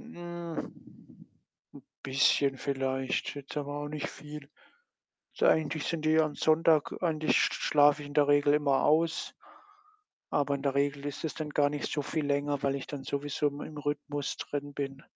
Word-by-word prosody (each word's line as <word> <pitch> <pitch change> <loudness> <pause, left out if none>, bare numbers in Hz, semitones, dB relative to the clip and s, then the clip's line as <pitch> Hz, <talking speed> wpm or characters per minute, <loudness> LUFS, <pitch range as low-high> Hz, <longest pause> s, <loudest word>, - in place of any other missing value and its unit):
'n 175 -7 -9 0.8
bisschen 135 0 +3
vielleicht. 135 -1 -1
Jetzt 140 0 -8
aber 145 0 -3
auch 145 - -4
nicht 150 -1 -4
viel. 150 -1 -10 0.8
So - - +1
eigentlich 155 -1 +2
sind 160 -2 -2
die 160 +1 +4
am 155 -2 0
Sonntag 155 -1 +3
an 160 -3 0
sich 155 - +2
schlafe 145 0 +3
ich - - -8
in 145 - -10
der 145 -1 +4
Regel 145 0 +4
immer 145 -2 +2
aus, 160 +2 +2 1.0
aber 140 -1 +1
in 140 - -4
der 140 -1 0
Regel 140 0 0
ist 145 +2 -5
es 160 - -2
dann 155 -2 -5
gar 145 -1 +3
nicht 145 -1 -4
so 145 - 0
viel 150 +2 -2
länger, 145 0 0
weil 140 0 +1
ich 135 - -6
dann 140 -2 -6
sowieso 145 +1 -1
im 145 0 -8
in 155 - -8
Rhythmus 145 -1 -3
drin 145 0 -5
bin. 135 -1 -5
145 Hz, 175 wpm, -30 LUFS, 140-155 Hz, 1.0 s, die